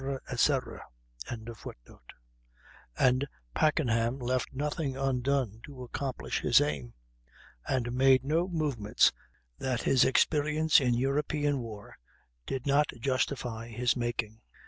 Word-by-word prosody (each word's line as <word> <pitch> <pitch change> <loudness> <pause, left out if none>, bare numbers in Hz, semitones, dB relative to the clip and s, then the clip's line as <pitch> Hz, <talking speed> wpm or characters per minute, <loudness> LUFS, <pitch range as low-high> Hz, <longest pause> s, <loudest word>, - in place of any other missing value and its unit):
etc.]; 130 +2 +1 0.5
and - - -5 0.3
Packenham 120 - +1
left 125 -1 -1
nothing 145 0 -3
undone 130 -4 0
to 135 -4 -9
accomplish 125 - -3
his - - +5
aim, 70 -5 -2 0.7
and 120 -2 -1
made 130 0 +4
no 165 +5 +1
movements 145 - +2 0.5
that 130 -3 -2
his 130 - +4
experience 150 +3 +3
in 125 -2 +2
European 145 +2 0
war 110 -4 -9 0.5
did 130 -1 -3
not 145 +1 +3
justify 125 -3 -2
his 120 +1 0
making. 120 -2 -3
130 Hz, 100 wpm, -30 LUFS, 115-140 Hz, 0.7 s, his